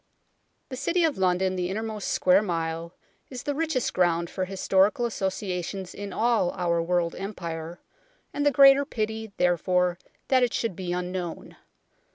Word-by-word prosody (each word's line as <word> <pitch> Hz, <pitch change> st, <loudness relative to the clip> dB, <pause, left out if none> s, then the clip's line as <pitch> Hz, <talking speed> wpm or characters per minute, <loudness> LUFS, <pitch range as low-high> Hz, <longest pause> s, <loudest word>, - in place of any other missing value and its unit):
The 260 Hz, -, -5 dB
City 335 Hz, +7 st, 0 dB
of 315 Hz, -10 st, +1 dB
London 185 Hz, 0 st, +1 dB
the 180 Hz, -1 st, -2 dB
innermost 215 Hz, +1 st, -4 dB
" -, -, -1 dB
square 185 Hz, +2 st, +4 dB
mile 165 Hz, -3 st, -3 dB, 0.2 s
" -, -, -42 dB
is 255 Hz, -2 st, -7 dB
the 290 Hz, -, -1 dB
richest 310 Hz, -4 st, -1 dB
ground 170 Hz, -2 st, +1 dB
for 185 Hz, -, -2 dB
historical 195 Hz, +4 st, +2 dB
associa 190 Hz, -4 st, -2 dB
tions 190 Hz, +1 st, -6 dB
in 200 Hz, 0 st, -7 dB
all 225 Hz, -4 st, +2 dB
our 170 Hz, -2 st, 0 dB
world 170 Hz, 0 st, 0 dB
Empire, 170 Hz, -4 st, -6 dB, 0.5 s
and 290 Hz, -, -1 dB
the 290 Hz, -, +5 dB
greater 275 Hz, 0 st, +7 dB
pity, 220 Hz, -4 st, -4 dB
therefore, 180 Hz, 0 st, +1 dB, 0.3 s
that 260 Hz, -1 st, +4 dB
it 245 Hz, -2 st, +1 dB
should 225 Hz, -6 st, -1 dB
be 180 Hz, 0 st, -4 dB
unknown. 180 Hz, -1 st, -4 dB
190 Hz, 165 wpm, -26 LUFS, 175-225 Hz, 0.5 s, greater